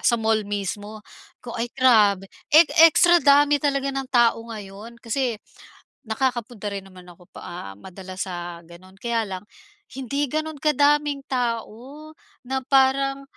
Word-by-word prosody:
sa 235 Hz, -, +2 dB
mall 220 Hz, -2 st, 0 dB
mismo, 205 Hz, +1 st, -5 dB, 0.4 s
ko 240 Hz, -, -7 dB
ay 235 Hz, +1 st, -3 dB
grabe, 210 Hz, -7 st, +4 dB, 0.2 s
e 315 Hz, +2 st, +7 dB, 0.2 s
extra 345 Hz, +2 st, +4 dB
dami 290 Hz, 0 st, +4 dB
talaga 275 Hz, -1 st, -1 dB
ng 270 Hz, -1 st, -4 dB
tao 235 Hz, -3 st, +2 dB
ngayon. 215 Hz, +1 st, -10 dB
Kasi 235 Hz, 0 st, -2 dB, 0.7 s
nakakapunta 240 Hz, -2 st, -3 dB
rin 200 Hz, -1 st, -4 dB
naman 185 Hz, -1 st, -15 dB
ako 175 Hz, 0 st, -17 dB
pa -, -, -12 dB
ah, 135 Hz, -, -8 dB
madalas 185 Hz, -, -8 dB
sa 175 Hz, -2 st, -6 dB
gano'n, 185 Hz, +3 st, -16 dB
kaya 235 Hz, +1 st, -1 dB
lang, 195 Hz, -1 st, -7 dB, 0.5 s
hindi 275 Hz, +2 st, -2 dB
gano'n 310 Hz, +2 st, -4 dB
kadaming 290 Hz, 0 st, +2 dB
tao 250 Hz, +4 st, -4 dB, 0.3 s
na 265 Hz, +1 st, -3 dB
parang, 275 Hz, 0 st, +2 dB
235 Hz, 140 wpm, -23 LUFS, 205-275 Hz, 0.7 s, e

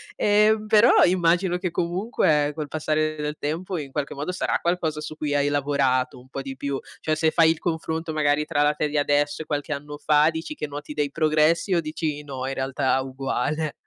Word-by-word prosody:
Ehm, 210 Hz, +1 st, +3 dB
però 215 Hz, +1 st, +6 dB
immagino 180 Hz, 0 st, +2 dB
che 180 Hz, -2 st, -3 dB
comunque, 170 Hz, -5 st, +1 dB
col 150 Hz, -2 st, -5 dB
passare 155 Hz, 0 st, -1 dB
del 150 Hz, 0 st, -3 dB
tempo, 170 Hz, +5 st, -3 dB
in 140 Hz, -4 st, -6 dB
qualche 145 Hz, 0 st, -3 dB
modo 145 Hz, +5 st, -3 dB
sarà 180 Hz, -, -1 dB
qualcosa 165 Hz, -3 st, -1 dB
su 155 Hz, 0 st, -7 dB
cui 145 Hz, -2 st, -2 dB
hai 145 Hz, 0 st, +2 dB
lavorato 140 Hz, -3 st, +1 dB
un 125 Hz, +1 st, -16 dB
po' 135 Hz, -, -5 dB
di 135 Hz, 0 st, -7 dB
più. 140 Hz, 0 st, -3 dB, 0.2 s
Cioè 155 Hz, -, 0 dB
se 160 Hz, 0 st, +2 dB
fai 160 Hz, -1 st, +5 dB
il 165 Hz, -, -3 dB
confronto 160 Hz, -1 st, -3 dB
magari 150 Hz, -1 st, +1 dB
tra 145 Hz, -1 st, +1 dB
la 150 Hz, 0 st, +3 dB
te 150 Hz, 0 st, -1 dB
di 150 Hz, 0 st, -2 dB
adesso 145 Hz, +1 st, +1 dB
e -, -, -7 dB
qualche 145 Hz, -1 st, -2 dB
anno 145 Hz, +1 st, -7 dB
fa, 150 Hz, +1 st, +4 dB
dici 165 Hz, -, -6 dB
che 150 Hz, -, -4 dB
noti 145 Hz, +1 st, -7 dB
dei 145 Hz, -1 st, -1 dB
progressi 155 Hz, +4 st, +2 dB
o 170 Hz, -, +2 dB
dici 155 Hz, -1 st, -3 dB
no, 135 Hz, -2 st, -5 dB
in 135 Hz, -, -2 dB
realtà 130 Hz, 0 st, 0 dB
uguale? 135 Hz, +3 st, -2 dB
150 Hz, 210 wpm, -24 LUFS, 145-165 Hz, 0.2 s, però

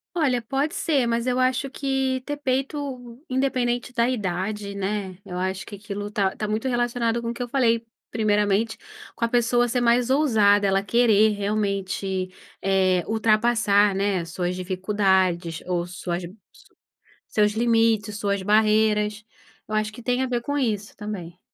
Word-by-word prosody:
Olha, 270 Hz, -8 st, +1 dB
pode 275 Hz, +7 st, -1 dB
ser 280 Hz, -6 st, +1 dB
mas 235 Hz, +1 st, -1 dB
eu 250 Hz, 0 st, +1 dB
acho 255 Hz, +2 st, +1 dB
que 265 Hz, -1 st, -1 dB
ter 290 Hz, 0 st, -3 dB
peito 265 Hz, -2 st, -3 dB
independente 250 Hz, -2 st, 0 dB
da 235 Hz, 0 st, +2 dB
idade, 200 Hz, -2 st, -3 dB
né, 195 Hz, -2 st, -3 dB
eu 180 Hz, -, -6 dB
acho 190 Hz, +1 st, -2 dB
que 205 Hz, -, -8 dB
aquilo 205 Hz, 0 st, -6 dB
tá 200 Hz, -2 st, 0 dB
tá 215 Hz, -, -3 dB
muito 215 Hz, +5 st, -1 dB
relacionado 240 Hz, -1 st, 0 dB
com 230 Hz, -, -3 dB
o -, -, -2 dB
que 245 Hz, -, -4 dB
eu -, -, -5 dB
falei 230 Hz, -4 st, +2 dB, 0.2 s
primeiramente, 210 Hz, 0 st, +1 dB, 0.4 s
com 230 Hz, -, 0 dB
a -, -, 0 dB
pessoa 240 Hz, +1 st, +2 dB
ser 245 Hz, +1 st, 0 dB
mais 240 Hz, +1 st, +3 dB
ousada, 220 Hz, -8 st, +4 dB
ela 195 Hz, 0 st, +2 dB
querer 220 Hz, -1 st, +4 dB
realmente, 200 Hz, -2 st, -2 dB, 0.3 s
eh, 190 Hz, -2 st, +2 dB
ultrapassar, 215 Hz, -2 st, +3 dB
né, 195 Hz, 0 st, 0 dB
as 165 Hz, -, -8 dB
suas 180 Hz, +1 st, -2 dB
dificuldades 185 Hz, -2 st, 0 dB
ou 175 Hz, -1 st, -1 dB
suas 175 Hz, 0 st, -4 dB, 1.1 s
seus 210 Hz, -1 st, +2 dB
limites, 225 Hz, -2 st, +2 dB
suas 200 Hz, -1 st, -1 dB
barreiras, 210 Hz, 0 st, +2 dB, 0.4 s
eu 215 Hz, -, -4 dB
acho 215 Hz, 0 st, 0 dB
que 240 Hz, -, -11 dB
tem 250 Hz, +2 st, 0 dB
a 260 Hz, -, +1 dB
ver 245 Hz, -1 st, -1 dB
com 285 Hz, +4 st, -2 dB
isso 215 Hz, -6 st, -2 dB
também. 185 Hz, -5 st, -7 dB
215 Hz, 160 wpm, -24 LUFS, 200-245 Hz, 1.1 s, ousada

